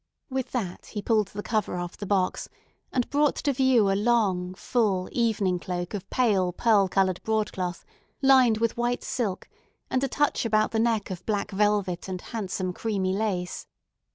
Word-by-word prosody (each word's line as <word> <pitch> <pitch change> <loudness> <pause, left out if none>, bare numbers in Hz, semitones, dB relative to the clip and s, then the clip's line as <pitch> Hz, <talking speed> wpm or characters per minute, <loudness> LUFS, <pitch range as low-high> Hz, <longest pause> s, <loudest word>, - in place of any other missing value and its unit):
With 260 -1 -2
that 195 -8 -4
he 210 - -5
pulled 215 -3 +2
the 205 +1 -7
cover 215 -5 -1
off 175 0 -5
the 205 - -7
box, 190 -2 0 0.4
and 250 -2 0
brought 290 0 +3
to 285 - 0
view 250 -6 +4
a - - +3
long, 195 -4 +1
full 195 -4 0
evening 210 -6 +1
cloak 175 0 -4
of 200 -2 -5
pale 200 -8 +2
pearl 205 +1 +3
colored 185 -1 +1
broadcloth 190 -5 -2 0.3
lined 260 -5 +5
with 230 +1 0
white 240 +1 0
silk, 210 -7 -2 0.4
and 260 - +1
a - - +2
touch 290 +2 +1
about 215 -2 +2
the 225 - 0
neck 225 -3 +1
of 180 - -6
black 205 -2 -1
velvet 200 -3 +1
and 185 -1 -4
handsome 185 -4 -4
creamy 195 -3 -1
lace. 190 -4 -2
210 Hz, 170 wpm, -26 LUFS, 185-235 Hz, 0.4 s, lined